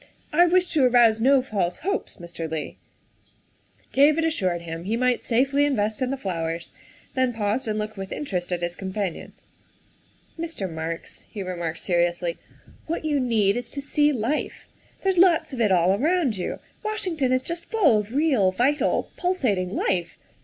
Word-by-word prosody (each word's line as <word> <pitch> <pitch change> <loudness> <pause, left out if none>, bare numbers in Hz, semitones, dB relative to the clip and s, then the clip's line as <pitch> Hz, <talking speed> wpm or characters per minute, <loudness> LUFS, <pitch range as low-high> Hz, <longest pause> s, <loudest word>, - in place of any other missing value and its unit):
I 350 +3 +6
wish 360 +1 +2
to 300 -4 +3
arouse 235 -3 +5
no 265 +1 +5
false 195 -8 -1
hopes, 400 +1 -2
Mr. 170 -3 -6
Leigh." 155 -1 -4 1.2
David 300 +4 +4
assured 185 - -1
him 165 +1 -6
he 220 +4 0
might 250 0 +1
safely 270 +4 +2
invest 220 -7 0
in 255 - +1
the 275 - -2
flowers, 165 -6 -4 0.4
then 260 -2 +1
paused 225 +2 -1
and 215 -1 -1
looked 215 0 -4
with 195 0 -6
interest 185 -11 -3
at 175 -1 -2
his 175 0 -1
companion. 190 -2 -4 0.5
" - - -30
Mr. 325 - -3
Marks," 165 0 -6
he 205 - -5
remarked 170 -3 -4
seriously, 175 -1 0 0.2
" - - -25
what 320 0 -3
you 295 -2 +1
need 220 -6 +2
is 245 - -4
to 285 - -4
see 295 +1 +2
life. 260 +3 -2 0.4
There's 380 -2 +2
lots 330 -4 +4
of 245 - -2
it 210 -3 +3
all 180 0 +4
around 295 - +1
you; 180 - -3 0.3
Washington 365 -11 -1
is 255 0 +2
just 340 +2 -5
full 315 - +3
of 210 +4 -6
real, 270 -11 +3
vital, 265 +9 +1
pulsating 220 - 0
life. 175 -3 -1
230 Hz, 170 wpm, -24 LUFS, 185-290 Hz, 1.2 s, I